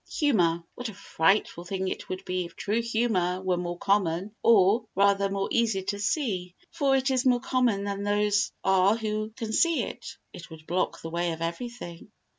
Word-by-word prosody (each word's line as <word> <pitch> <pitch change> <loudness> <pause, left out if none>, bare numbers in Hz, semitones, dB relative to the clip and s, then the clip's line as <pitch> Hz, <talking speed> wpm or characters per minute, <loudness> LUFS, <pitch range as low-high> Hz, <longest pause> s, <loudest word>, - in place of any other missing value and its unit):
Humour 175 - +2
What 245 -1 -5
a 210 - -10
frightful 175 -1 +1
thing 190 +1 -3
it - - -5
would 185 0 -5
be 185 -1 -2
if 170 - -12
true 215 +3 -1
humour 220 -6 0
were 185 -1 0
more 175 0 -4
common 195 0 0
or, 220 +1 +4
rather, 200 0 +3
more 195 0 -1
easy 225 -5 +1
to 200 +1 -3
see, 200 - -1 0.2
for 280 -5 +2
it 265 +1 +1
is 260 -1 +1
more 250 -2 +3
common 245 -6 +1
than 200 0 -3
those 205 0 +1
are 190 +3 +4
who 215 -1 -2
can 225 -3 -5
see 335 +7 +3
it. - - -8 0.2
It 170 - -10
would 160 -1 -12
block 180 +3 -2
the 165 - -6
way 170 0 -1
of 165 +1 -5
everything. 175 0 -6
200 Hz, 190 wpm, -27 LUFS, 180-230 Hz, 0.2 s, or